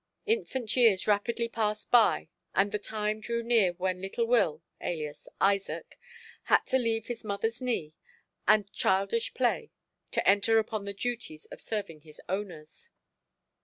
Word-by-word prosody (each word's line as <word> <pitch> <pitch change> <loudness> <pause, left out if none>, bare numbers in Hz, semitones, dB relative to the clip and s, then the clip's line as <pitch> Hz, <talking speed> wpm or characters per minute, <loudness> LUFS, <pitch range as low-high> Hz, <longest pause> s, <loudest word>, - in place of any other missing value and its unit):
Infant 265 - 0
years 225 -7 +5
rapidly 230 +3 +1
passed 215 -2 -2
by 235 -3 +5 0.3
and 200 +1 +3
the 210 - -1
time 215 0 -2
drew 235 +1 -2
near 225 -6 +4
when 185 0 -2
little 195 +5 -1
Will, 170 -10 +2 0.2
alias 155 -3 -4
Isaac, 195 0 0 0.5
had - - +4
to 260 - +2
leave 225 -2 0
his 240 -2 -6
mother's 220 +3 -2
knee 225 -12 -2 0.5
and 210 -2 +4
childish 460 - +1
play - - +1 0.4
to - - -1
enter 205 +3 +5
upon 215 -2 -1
the 200 - -4
duties 230 -9 -4
of - - -9
serving 200 -8 -4
his 155 0 -15
owners. 190 - -5
210 Hz, 145 wpm, -29 LUFS, 190-235 Hz, 0.5 s, years